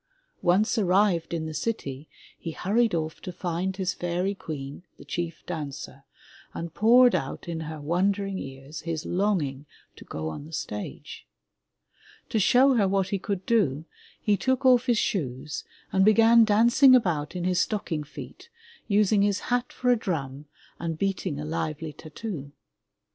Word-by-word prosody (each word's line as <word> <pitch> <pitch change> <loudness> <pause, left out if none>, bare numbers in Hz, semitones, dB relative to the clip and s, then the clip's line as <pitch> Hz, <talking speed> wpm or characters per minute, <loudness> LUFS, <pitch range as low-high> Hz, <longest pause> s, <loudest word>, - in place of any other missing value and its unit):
Once 205 +6 +3
arrived 190 -3 +2
in 165 -2 -2
the 160 - -5
city, 155 -6 -4 0.3
he 165 - -6
hurried 220 +6 +1
ofif 160 -1 -2
to 180 - -7
find 180 +2 -3
his 185 -1 -1
fairy 175 +3 -1
queen, 145 -6 -7 0.2
the - - -13
chief 170 -1 -4
dancer, 140 -4 -6 0.5
and 170 -1 -5
poured 240 +5 +6
out - - -3
in 165 -1 -3
her 160 -1 -6
wondering 190 +5 0
ears 135 +3 -8
his 165 -2 -4
long 195 -1 +1
ing 135 +2 -8 0.3
to - - -12
go 80 0 -5
on 80 - -5
the 155 - -12
stage. 105 -9 -6 1.0
To 220 - +1
show 255 +6 +5
her 210 -5 +3
what 190 0 +1
he 200 - -1
could 195 -1 -3
do, 165 - +1 0.3
he 210 - +2
took 260 +4 0
off 255 -1 +5
his 240 -2 +3
shoes 150 -7 -2 0.3
and 190 - +3
began 225 +2 +6
dancing 240 +5 +6
about 170 -10 0
in 180 - -3
his 180 0 +2
stocking 175 -8 -2
feet, 150 - -11 0.4
using 205 0 +3
his 200 0 +2
hat 245 0 0
for 250 -1 +1
a - - +5
drum 150 - -4 0.3
and 165 -2 -3
beating 185 -5 -2
a 150 - -4
lively 155 0 -3
tattoo! 155 -3 -7
180 Hz, 160 wpm, -26 LUFS, 155-210 Hz, 1.0 s, poured